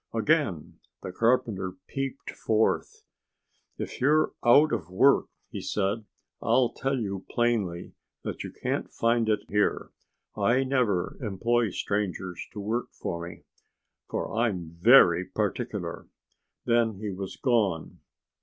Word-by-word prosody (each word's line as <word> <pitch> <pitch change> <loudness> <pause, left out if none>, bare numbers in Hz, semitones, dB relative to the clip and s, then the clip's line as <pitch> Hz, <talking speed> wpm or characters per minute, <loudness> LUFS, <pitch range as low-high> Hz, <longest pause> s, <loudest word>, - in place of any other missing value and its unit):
Again 115 - 0 0.2
the 95 - -5
carpenter 115 -4 +1
peeped 135 +3 -4
forth. 110 0 0 0.7
"If - - -6
you're 150 +4 +3
out 145 +5 +6
of 90 -8 -3
work," 130 +10 +4 0.2
he - - -5
said, 105 +2 -1 0.4
"I'll 130 -2 +3
tell 135 0 -1
you 100 -5 -3
plainly 110 -8 -1 0.3
that - - -4
you - - -7
can't - - -3
find 115 -1 +1
it 105 -1 +2
here. 105 0 0 0.4
I 125 +3 +2
never 125 -9 0
employ 115 +2 +1
strangers 95 -2 -3
to - - -6
work 110 +4 -2
for 85 0 -5
me, - - -13 0.7
for - - -3
I'm 100 -8 -1
very 90 -5 +7
particular." - - -3 0.6
Then 115 -2 +2
he 105 +1 -5
was 95 0 -6
gone. 105 - 0
110 Hz, 125 wpm, -27 LUFS, 95-120 Hz, 0.7 s, very